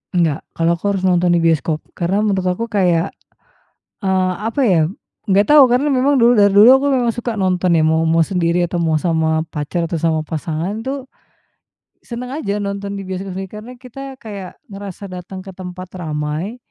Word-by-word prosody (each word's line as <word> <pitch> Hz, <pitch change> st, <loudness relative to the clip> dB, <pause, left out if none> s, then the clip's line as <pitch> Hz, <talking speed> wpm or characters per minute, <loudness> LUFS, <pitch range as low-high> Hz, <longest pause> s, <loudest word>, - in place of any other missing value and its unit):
Enggak, 165 Hz, -4 st, +2 dB, 0.2 s
kalau 165 Hz, 0 st, +2 dB
aku -, -, -30 dB
harus 190 Hz, -, -3 dB
nonton 175 Hz, -1 st, +3 dB
di -, -, +3 dB
bioskop, 160 Hz, -1 st, +1 dB
karena 190 Hz, +4 st, -1 dB
menurut 190 Hz, -3 st, 0 dB
aku 230 Hz, +6 st, -2 dB
kayak, 180 Hz, -5 st, +2 dB, 0.9 s
eee, 190 Hz, -2 st, +1 dB
apa 275 Hz, +5 st, -1 dB
ya 180 Hz, -7 st, +4 dB, 0.5 s
nggak 200 Hz, +1 st, +4 dB
tahu 295 Hz, -1 st, +7 dB
karena 265 Hz, +4 st, +2 dB
memang 270 Hz, +2 st, +3 dB
dulu 235 Hz, -1 st, +5 dB
dari 205 Hz, 0 st, +6 dB
dulu 210 Hz, +4 st, +8 dB
aku 285 Hz, -, 0 dB
memang 250 Hz, -4 st, +2 dB
suka 235 Hz, -1 st, -4 dB
nonton 185 Hz, -2 st, +1 dB
ya 160 Hz, -, +3 dB
mau 160 Hz, +1 st, +3 dB
mau 165 Hz, 0 st, +4 dB
sendiri 175 Hz, -1 st, 0 dB
atau 175 Hz, 0 st, -2 dB
mau 160 Hz, -2 st, +1 dB
sama 160 Hz, -1 st, +1 dB
pacar 155 Hz, +3 st, -2 dB
atau 165 Hz, -1 st, -3 dB
sama 160 Hz, -1 st, 0 dB
pasangan 165 Hz, +6 st, -3 dB
tuh, 270 Hz, +2 st, -4 dB, 1.0 s
senang 250 Hz, +1 st, -7 dB
aja 205 Hz, -9 st, -2 dB
nonton 200 Hz, 0 st, -4 dB
di 200 Hz, -, -5 dB
bioskop 185 Hz, 0 st, -5 dB
usi 195 Hz, -, -3 dB
karena 215 Hz, +4 st, -9 dB
kita 265 Hz, +2 st, -9 dB
kayak 200 Hz, -6 st, -9 dB, 0.2 s
ngerasa 200 Hz, 0 st, -8 dB
datang 185 Hz, +1 st, -8 dB
ke 195 Hz, -, -9 dB
tempat 185 Hz, 0 st, -8 dB
ramai, 155 Hz, +6 st, -3 dB
185 Hz, 185 wpm, -18 LUFS, 170-220 Hz, 1.0 s, dulu